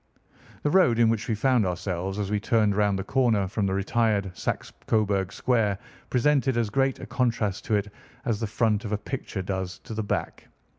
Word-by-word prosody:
The 150 - +2
road 150 -11 +5
in 115 -1 +5
which 115 -1 -1
we 110 - +1
found 125 +1 +3
ourselves 90 +1 -2
as 105 -1 -2
we 105 - +1
turned 105 -1 +2
round 105 -1 +2
the 95 - -3
corner 115 -7 +2
from 100 +1 -1
the 95 - 0
retired 100 -2 0
Saxe - - -3
Coburg 100 -4 +1
Square 110 -6 +1 0.3
presented 130 -1 +2
as 115 -3 0
great 135 +2 +1
a - - -7
contrast 115 -5 -1
to 110 - +1
it 105 0 -2 0.3
as 115 -5 0
the 115 - -1
front 105 0 +1
of 105 - -5
a - - +2
picture 105 -3 -5
does 95 -1 -3
to - - -7
the 110 - -2
back. 105 - -3
105 Hz, 200 wpm, -26 LUFS, 100-120 Hz, 0.3 s, road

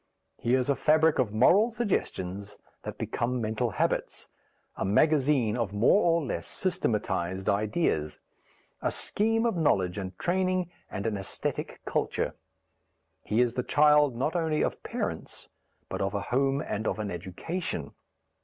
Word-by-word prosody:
He 120 +2 +2
is 130 -1 +1
a 140 - +3
fabric 155 +1 +3
of 120 -5 +2
moral 180 - +5
suggestions 105 - -3 0.2
that - - -7
become 125 +2 -2
mental 110 +2 -1
habits, - - -1 0.5
a - - -3
magazine 130 +1 +3
of 115 -5 -2
more 115 - +4
or 165 -2 +2
less - - -4
systematized 105 - -1
ideas, 100 - 0 0.6
a - - +1
scheme 225 +2 0
of 230 - +1
knowledge 95 - +1
and 95 -2 -6
training 185 0 0 0.2
and 100 +2 -5
an 115 - 0
æsthetic 95 - -4
culture. - - -1 0.9
He 110 +3 +1
is 120 -2 +2
the 125 - -1
child 150 -1 +4
not 140 +8 -1
only 160 -3 +1
of - - -2
parents - - -5 0.4
but - - -4
of - - -1
a - - -1
home 135 +2 +2
and 110 +2 -3
of 95 - -1
an 105 -2 -3
education. 95 - -4
125 Hz, 145 wpm, -28 LUFS, 105-160 Hz, 0.9 s, moral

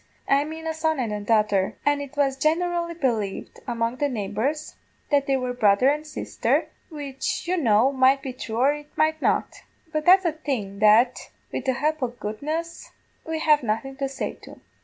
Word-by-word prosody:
I 275 +1 +4
mane 320 +1 -7
a 320 - -1
son 315 -2 0
and 210 -4 -3
daughter, 210 -4 +2
and 290 0 +2
it 285 0 -9
was 275 -2 +2
generally 340 +3 0
believed 225 - -2
among 235 0 -1
the 290 0 0
neighbours 230 +7 -2 0.4
that 280 -1 +3
they 270 -1 +2
were 250 -1 -2
brother 220 +1 +4
and 300 +2 -1
sisther, 300 - -1 0.2
which 285 -1 -4
you 365 - +1
know 240 - +3
might 270 0 +3
be 265 - -4
thrue 230 -3 -6
or 270 +4 +4
it 295 0 -11
might 315 0 +2
not: - - 0 0.3
but 310 -1 -2
that's 375 +1 +7
a 335 - +3
thing 250 -11 -4
that, 215 +4 +4 0.2
wid 260 - -4
the 260 - +2
help 305 +3 -1
o' 255 - +1
goodness, 285 +9 -5 0.4
we 320 0 -2
have 305 -1 +4
nothing 235 +4 -2
to 275 -1 -2
say 270 - -4
to. - - -13
275 Hz, 185 wpm, -24 LUFS, 235-310 Hz, 0.4 s, that's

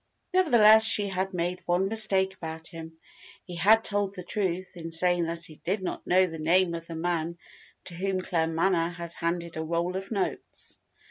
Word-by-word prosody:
Nevertheless, 225 -12 +6
she 210 -2 +4
had 190 0 -2
made 180 0 -2
one 180 +2 +2
mistake 195 -3 +2
about 160 -2 -7
him. 160 -1 -10 0.5
He 180 - -8
had 215 +6 +4
told 205 -2 -1
the 180 - -7
truth 185 -1 -2
in 165 -1 -7
saying 175 +1 +2
that 165 0 -5
he 155 - -11
did 190 +3 -3
not - - -5
know 185 +1 +4
the 165 -3 -7
name 170 +3 +2
of 165 0 -6
the 165 - -7
man 170 0 -2 0.5
to 180 - -6
whom 190 +2 -2
Claremanagh 170 0 0
had 170 -1 -8
handed 170 -1 -3
a 160 - -2
roll 170 +3 -2
of 190 +1 -5
notes. 200 -4 -4
175 Hz, 185 wpm, -27 LUFS, 165-190 Hz, 0.5 s, Nevertheless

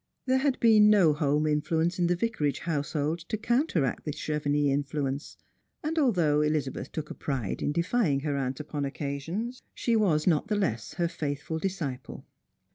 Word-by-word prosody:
There 260 0 +3
had 275 -1 +1
been 215 -3 +6
no 190 -7 +5
home 150 0 +1
influence 160 +3 0
in 175 - +3
the 175 - +2
Vicarage 170 - -1
household 155 0 -1
to 220 - -1
counteract 225 - 0
the 150 - -3
Chevenix 145 -1 0
influence, 140 0 -3 0.5
and 320 +2 0
although 170 - +3
Elizabeth 150 -3 -1
took 155 -1 -5
a - - -3
pride 130 -9 -3
in - - 0
defying 170 - +1
her 145 -1 -1
aunt 135 0 -2
upon 150 -1 -4
occasions, 150 - -4
she 235 - +1
was 175 -9 +2
not 160 -5 +2
the 210 - 0
less 115 - -2
her 170 - +1
faithful 155 -1 -3
disciple. 155 -9 -4
155 Hz, 165 wpm, -28 LUFS, 145-195 Hz, 0.5 s, been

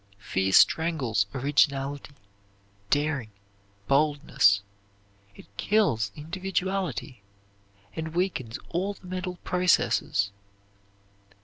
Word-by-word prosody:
Fear 95 -1 -1
strangles 135 - +3
originality, 140 +1 0 0.7
daring, 145 -4 0 0.6
boldness; 140 -8 +3 0.7
it - - -13
kills 115 - +1
individuality, 180 - -3 0.7
and 160 0 -5
weakens 160 -11 -1
all 190 +4 -2
the - - -18
mental 180 0 -4
processes. 120 - +1
145 Hz, 75 wpm, -27 LUFS, 115-180 Hz, 0.7 s, strangles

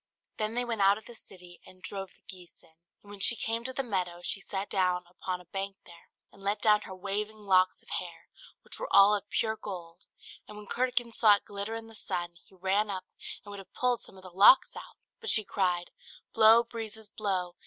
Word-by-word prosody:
Then 215 +1 -1
they 245 0 +1
went 230 -3 -2
out 195 +1 +5
of 220 - -13
the 240 - -10
city, 180 -5 -13
and 185 0 -16
drove 195 -1 -5
the - - -29
geese 180 -2 -11
in. - - -22 0.3
And 205 - -14
when 205 - -10
she 235 - +6
came 230 0 -2
to 260 - -3
the 270 +1 -2
meadow, 180 -6 -2
she 200 - -2
sat 195 0 -4
down 180 -2 0
upon 180 +1 -5
a 180 - -15
bank 195 +2 -5
here, 170 -1 -16 0.2
and 200 - -18
let 200 +1 -1
down 210 -1 +4
her 190 - -9
waving 205 +3 -4
locks 185 -1 +3
of - - -20
hair, - - -10 0.4
which - - -12
were - - -3
all 200 +1 +7
of 205 -1 -2
pure 220 -1 0
gold; 175 -4 -8 0.4
and 210 - -11
when 210 - -10
Curdken 245 0 0
saw 215 -2 +6
it 200 - -8
glitter 205 +2 -5
in 225 0 -6
the 225 - -14
sun, 175 -5 -4
he 190 - -23
ran 195 +3 0
up, 190 -2 -4 0.4
and 205 - -9
would 200 - -7
have 195 - -14
pulled 250 -2 +1
some 190 - -9
of 190 - -14
the 185 - -11
locks 200 - +6
out; - - -10 0.2
but 450 -2 -4
she 215 - +4
cried 180 -3 -1 0.4
"Blow, 225 +1 +7
breezes, 220 -2 -7
blow! 190 -4 -2
200 Hz, 230 wpm, -30 LUFS, 185-220 Hz, 0.4 s, all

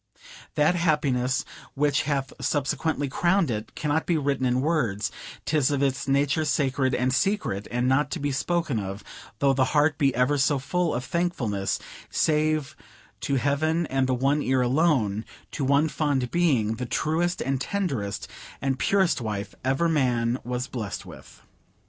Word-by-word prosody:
That 150 +3 +4
happiness, 145 -7 +1 0.3
which 145 0 +2
hath 135 -2 -1
subsequently 145 +1 0
crowned 175 +2 +2
it, 110 0 -5
cannot 150 +1 -1
be 170 - +2
written 140 -3 0
in 125 +1 +1
words; 120 -10 0 0.3
'tis 145 -3 +2
of 140 -1 0
its 135 0 0
nature 140 +3 +2
sacred 135 -2 +1
and 125 0 +1
secret, 130 - 0
and 125 +1 0
not 135 +2 +2
to 170 - -4
be 145 0 -1
spoken 150 -2 0
of, 100 +1 -5 0.3
though 135 +3 +3
the 135 0 +2
heart 150 +1 +3
be 140 -2 +4
ever 125 +4 +2
so 145 +1 +3
full 165 +4 -1
of 125 +1 -3
thankfulness, 130 - -1 0.3
save 155 -2 +1 0.4
to 140 - -1
Heaven 155 +5 +1
and 135 -1 +1
the 130 - +1
One 140 +4 +1
Ear 130 -1 +1
alone 125 -6 +2 0.3
to 145 - -3
one 140 +3 +3
fond 145 -4 -1
being, 125 -11 +2
the 125 0 -4
truest 170 +7 0
and 135 0 -1
tenderest 135 - -2 0.3
and 135 -1 -1
purest 190 -8 +2
wife 105 -3 -4
ever 135 +6 +1
man 125 -5 +1
was 125 0 -3
blessed 115 -7 -5
with. - - -13
140 Hz, 160 wpm, -26 LUFS, 125-155 Hz, 0.4 s, That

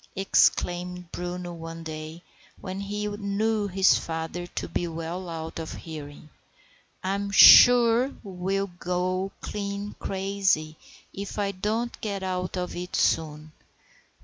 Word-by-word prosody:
exclaimed 180 -2 +1
Bruno 175 0 -5
one 165 0 -8
day, 155 +1 -7 0.4
when 185 0 -6
he 205 +1 -3
knew 205 +1 -1
his 190 0 +4
father 165 +2 -5
to - - -5
be 175 - -2
well 165 +2 -5
out 165 0 -6
of 160 - -6
hearing. 150 -2 -9 0.8
"I'm 200 +2 -1
sure 240 +5 +8
I'll 195 +1 -2
go 185 +2 -1
clean 200 0 -4
crazy 190 -5 0 0.4
if 200 +1 -6
I 200 -1 0
don't 215 +5 -3
get 200 -3 -3
out 185 0 -3
of 180 0 -3
it 180 +1 -5
soon. 155 -1 0
185 Hz, 120 wpm, -26 LUFS, 165-200 Hz, 0.8 s, sure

